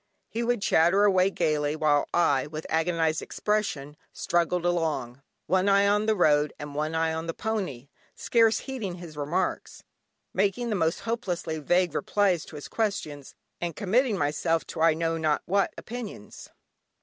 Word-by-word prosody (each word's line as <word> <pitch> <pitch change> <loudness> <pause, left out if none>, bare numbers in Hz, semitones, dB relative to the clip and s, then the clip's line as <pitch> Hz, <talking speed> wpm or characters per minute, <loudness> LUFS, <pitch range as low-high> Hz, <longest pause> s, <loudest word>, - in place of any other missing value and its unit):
He 230 - -3
would 235 -3 0
chatter 175 +5 +4
away 190 -2 +4
gaily, 155 -5 0
while 150 -2 +2
I, 145 -6 +2
with 155 +1 -7
agonised 160 -1 +1
expression, 195 -10 -2 0.2
struggled 175 0 0
along, 155 -8 -1 0.2
one 190 +1 +2
eye 200 0 +4
on 210 +1 +2
the 220 - +3
road 150 -5 +3
and 145 -1 -8
one 155 +2 -2
eye 160 0 +1
on 160 +1 -4
the 165 - -3
pony, 185 - -3 0.3
scarce 225 -2 +2
heeding 230 -10 -5
his 170 -3 -10
remarks, 160 +6 -2 0.5
making 205 +5 0
the - - +1
most 165 -3 0
hopelessly 180 -8 -3
vague 175 +2 +1
replies 190 -6 +1
to - - -12
his 145 - -7
questions, 195 -11 -3 0.3
and 175 -2 -3
committing 215 +3 +1
myself 155 +2 0
to 160 - -6
I 165 -1 +5
know 165 0 -1
not 155 -2 +1
what 195 +2 +1
opinions. 220 - -8
170 Hz, 160 wpm, -27 LUFS, 155-200 Hz, 0.5 s, I